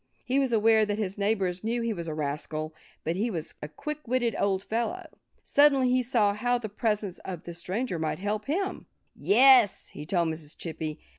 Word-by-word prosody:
He 265 +2 +2
was 270 -3 +1
aware 220 0 +4
that 205 -1 -1
his 200 -2 -3
neighbors 195 -3 0
knew 235 +2 -1
he 230 -1 0
was 170 -4 -6
a 160 - -3
rascal. 155 +1 -3 0.3
But 165 +2 -1
he 215 +6 0
was 165 -7 -4
a 150 - -4
quick 300 - -6
witted 240 -1 +1
old 195 -1 +1
fellow. 235 - -2 0.4
Suddenly 275 -3 +4
he 255 0 +3
saw 225 -5 +2
how 245 +4 +1
the 225 -3 -6
presence 210 -3 -2
of 180 -4 -7
this 170 0 -8
stranger 185 +1 -3
might 160 -1 -1
help 210 +2 -2
him. 380 +6 -2 0.3
"Yes!" 260 - +5
he 150 - -9
told 170 -2 +1
Mrs. 155 -2 -6
Chippy. 160 -2 -5
210 Hz, 195 wpm, -28 LUFS, 170-245 Hz, 0.4 s, Yes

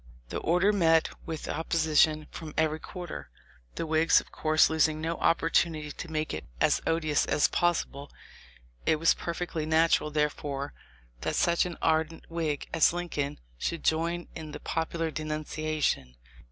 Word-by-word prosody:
The - - -3
order 180 +5 +3
met 165 -4 +3 0.2
with 160 -2 -5
opposition 155 -1 +2
from 155 -2 -8
every 155 0 +1
quarter 175 - -7 0.2
— - - -31
the - - -2
Whigs 160 +1 +4
of - - -12
course 155 0 +4
losing 155 -1 +2
no 165 +1 -2
opportunity 165 -2 +1
to 170 +3 -8
make 155 0 -2
it 80 - -4 0.2
as - - +3
odious 155 -2 +1
as 145 - +3
possible. 150 -5 0 0.8
It - - +5
was 165 +2 +4
perfectly 170 -2 -4
natural, 160 -1 +3
therefore, 145 -2 -2 0.5
that - - -2
such 170 +1 +3
an 175 - -7
ardent 160 0 +1
Whig 160 -4 -2
as 165 0 +4
Lincoln 155 - -3 0.2
should 170 -2 -2
join 170 +2 0
in 155 -2 -8
the - - -6
popular 165 0 -2
denunciation. 155 - -2
160 Hz, 150 wpm, -29 LUFS, 155-165 Hz, 0.8 s, It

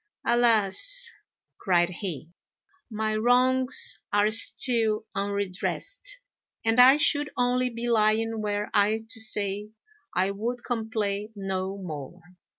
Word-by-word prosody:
"Alas!" 240 - +3 0.5
cried 175 -2 +1
he, 170 - -7 0.6
"my 215 -1 -3
wrongs 255 - +3
are 205 +1 +2
still 225 -1 +3
unredressed, 200 - -3 0.5
and 225 +2 +4
I 260 +3 +7
should 295 -1 +1
only 250 0 0
be 235 0 -6
lying 225 0 +1
were 210 0 -3
I 215 +1 +1
to 225 0 -6
say 210 -1 +2 0.5
I 190 +2 +1
would 235 +5 -5
complain 220 -3 -4
no 195 -1 -4
more." 160 -3 -8
220 Hz, 110 wpm, -25 LUFS, 200-245 Hz, 0.6 s, I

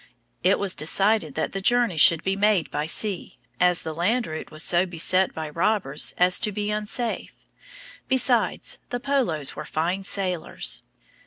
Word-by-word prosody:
It - - +3
was 200 -2 -2
decided 185 -1 +1
that 160 - -2
the 195 - -4
journey 240 -2 +2
should 160 +1 +6
be 190 0 0
made 200 -3 +1
by 150 +1 -2
sea, 195 +2 -1 0.2
as 180 -1 +2
the 160 - -5
land 215 +9 0
route 155 0 -7
was 155 +1 -5
so 175 +2 +2
beset 185 +2 +2
by 160 -1 -6
robbers 170 -4 0
as 180 0 +4
to 215 -2 -1
be 205 +1 -3
unsafe. 215 +3 -3 0.7
Besides, 260 -1 0
the 245 - -3
Polos 245 - -1
were - - -6
fine 175 +6 -2
sailors. 180 - -1
185 Hz, 160 wpm, -24 LUFS, 160-210 Hz, 0.7 s, should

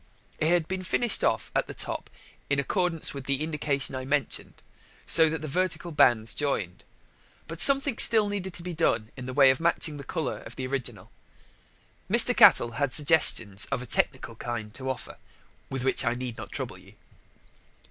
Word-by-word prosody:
It 155 - 0
had 170 -1 +1
been 190 0 -4
finished 220 +5 -1
off - - -1
at - - 0
the - - -9
top - - -5 0.4
in 140 - +1
accordance 170 +3 -2
with 140 -2 -8
the 140 +1 -1
indication 150 -3 -3
I 130 0 -5
mentioned, 140 -1 -3 0.5
so 160 -1 +6
that 155 -1 -5
the - - -4
vertical 175 +2 -2
bands 115 -7 +2
joined. 105 -12 -3 0.6
But 165 +1 0
something 275 -1 +7
still 220 -2 +5
needed 190 -3 -5
to 170 - -7
be 180 0 -6
done 115 -9 -1
in 125 -1 -9
the 130 - -6
way 135 -2 +6
of 130 - -3
matching 165 -2 -1
the 140 - -9
colour 140 -1 -4
of 120 - -12
the 130 - -5
original. 130 -1 -6 1.0
Mr. - - +6
Cattell 120 - +6
had 140 -3 0
suggestions 140 -10 +1
of 125 - -3
a - - -9
technical 125 0 -2
kind 110 -2 -6
to 130 0 -6
offer, 130 -2 -6 0.5
with 135 -2 -5
which 135 - +2
I 120 -1 -1
need 125 -2 -6
not - - -10
trouble - - -6
you. - - -19
140 Hz, 185 wpm, -26 LUFS, 125-165 Hz, 1.0 s, something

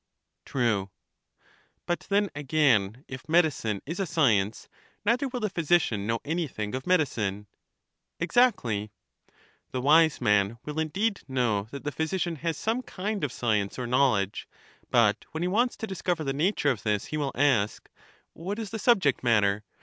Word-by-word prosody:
True. 110 -7 0 1.0
But 175 - -3
then 200 0 +2
again, 135 -6 +1
if 130 +3 -9
medicine 150 - +1
is 165 +6 -5
a 195 - -1
science, 110 -10 +1 0.4
neither 245 +6 +2
will 250 -1 -5
the 215 - +1
physician 160 - +1
know 115 0 0
anything 145 -10 -3
of 130 +3 -4
medicine. 110 - 0 0.7
Exactly. 170 - +2 0.8
The 130 - -3
wise 155 +4 +4
man 105 -1 +2
will 150 +1 -4
indeed 195 +7 -1
know 120 -6 0
that 140 +2 -8
the 150 - -2
physician 165 +2 -2
has 165 +1 -2
some 225 +3 -1
kind 205 -4 -4
of 145 - -1
science 105 -5 -1
or 125 - -3
knowledge; 120 -6 +1 0.4
but - - +3
when 160 +2 -2
he - - +1
wants 235 +7 +1
to - - -4
discover 180 -4 -2
the 135 -2 -1
nature 150 0 +1
of 115 -6 -4
this 105 -2 -1
he - - 0
will 145 -2 -1
ask. 120 -7 +1 0.5
What 190 +6 -5
is 220 -2 -5
the 220 - -4
subject 195 - +3
matter? 105 -3 +2
145 Hz, 155 wpm, -27 LUFS, 110-180 Hz, 1.0 s, wise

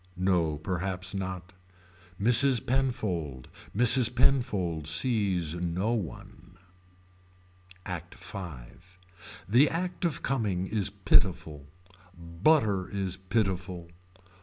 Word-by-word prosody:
No 90 -5 +1
perhaps 95 +3 -4
not. 95 -1 -5 0.7
Mrs. 120 +2 +4
Penfold. 95 - -2 0.3
Mrs. 125 0 +5
Penfold 95 - +1
sees 95 -3 +2
no 90 +5 -2
one. 110 -8 -6 1.3
ACT 90 -1 -7
V. 90 - -9 0.5
The 125 +8 +4
act 180 +2 -4
of 165 -5 -1
coming 105 -9 -1
is 105 0 -2
pitiful. 90 -7 +1 0.5
Butter 95 - +1
is 95 -3 -4
pitiful. 95 -3 -2
95 Hz, 85 wpm, -28 LUFS, 85-115 Hz, 1.3 s, Mrs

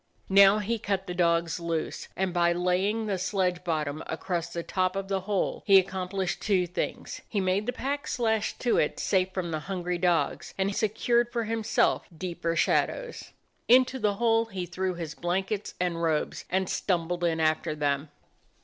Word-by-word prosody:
Now 195 +1 +7
he 220 +2 -1
cut 195 -2 -2
the 180 - -4
dogs 170 -1 +1
loose, 165 -2 -3
and 190 -1 -1
by 170 -1 +3
laying 185 +5 0
the 195 -3 -1
sledge 185 -1 0
bottom 155 -3 -2
up - - -8
across 170 +1 -2
the 170 0 -4
top 185 +1 0
of 195 0 -4
the 195 -1 +1
hole 200 -3 0
he 195 -1 +8
accomplished 185 -1 -1
two 190 -4 +2
things; 175 +1 -4
he 210 - -1
made 190 +3 0
the - - +1
packs 275 +3 -3
lashed 220 -3 0
to 240 - +2
it 150 - 0
safe 185 -1 +1
from 185 -3 -3
the 155 - -1
hungry 180 -2 -2
dogs, 170 -6 0
and 195 +1 0
secured 235 +3 +1
for 235 -1 -1
himself 225 0 +1
deeper 170 -1 -3
shadows. - - 0 0.4
Into 255 +2 +5
the 210 -3 +1
hole 225 +1 +3
he 190 -5 -5
threw 185 +1 -2
his 165 -3 -5
blankets 190 +5 -2
and 175 -2 -1
robes 160 -2 -1
and 190 0 0
stumbled 175 -2 -1
in 165 -2 +1
after 155 -1 +1
them. 145 0 -1
185 Hz, 175 wpm, -28 LUFS, 170-205 Hz, 0.4 s, he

